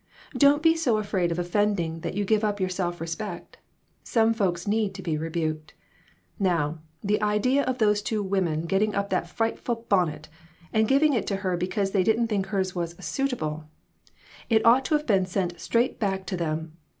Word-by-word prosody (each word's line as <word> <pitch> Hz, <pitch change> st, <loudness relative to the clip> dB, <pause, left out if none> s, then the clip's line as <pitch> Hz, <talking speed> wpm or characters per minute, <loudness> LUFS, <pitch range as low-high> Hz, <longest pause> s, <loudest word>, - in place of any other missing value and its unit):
Don't 285 Hz, +1 st, +5 dB
be 325 Hz, 0 st, +5 dB
so 260 Hz, -9 st, +1 dB
afraid 190 Hz, -5 st, 0 dB
of 165 Hz, -, -2 dB
offending 175 Hz, -2 st, 0 dB
that 165 Hz, -, -5 dB
you 205 Hz, 0 st, 0 dB
give 215 Hz, +2 st, +2 dB
up 205 Hz, -1 st, 0 dB
your 185 Hz, -1 st, 0 dB
self 175 Hz, -2 st, -2 dB
respect. 170 Hz, +3 st, -6 dB, 0.4 s
Some 225 Hz, -1 st, +2 dB
folks 180 Hz, -6 st, -1 dB
need 210 Hz, -1 st, 0 dB
to 190 Hz, -, -7 dB
be 165 Hz, -3 st, -1 dB
rebuked. 155 Hz, -1 st, -3 dB, 0.6 s
Now, 165 Hz, -5 st, 0 dB, 0.2 s
the 210 Hz, +1 st, +1 dB
idea 210 Hz, +6 st, +2 dB
of 255 Hz, 0 st, -1 dB
those 210 Hz, -3 st, +3 dB
two 210 Hz, 0 st, -2 dB
women 185 Hz, -5 st, 0 dB
getting 200 Hz, +4 st, +1 dB
up 200 Hz, 0 st, -1 dB
that 180 Hz, -2 st, 0 dB
frightful 230 Hz, +2 st, -2 dB
bonnet, 160 Hz, -6 st, +1 dB, 0.5 s
and 220 Hz, 0 st, +3 dB
giv 275 Hz, +5 st, +3 dB
ing 305 Hz, -2 st, +4 dB
it 235 Hz, -, -1 dB
to 200 Hz, -, 0 dB
her 185 Hz, -1 st, +1 dB
because 195 Hz, +3 st, -1 dB
they 195 Hz, -2 st, +2 dB
didn't 225 Hz, +3 st, +2 dB
think 200 Hz, -3 st, -1 dB
hers 190 Hz, -2 st, -1 dB, 0.2 s
' -, -, -25 dB
suit 275 Hz, 0 st, -1 dB
able 155 Hz, -9 st, -4 dB, 0.4 s
'! -, -, -23 dB
It 220 Hz, -2 st, +3 dB
ought 250 Hz, +3 st, +6 dB
to 310 Hz, -, +2 dB
have 300 Hz, 0 st, -1 dB
been 195 Hz, -6 st, +2 dB
sent 180 Hz, -2 st, -2 dB
straight 240 Hz, +2 st, 0 dB
back 195 Hz, -3 st, -1 dB
to 185 Hz, -, -3 dB
them. 160 Hz, -1 st, -3 dB
195 Hz, 200 wpm, -26 LUFS, 175-220 Hz, 0.6 s, ought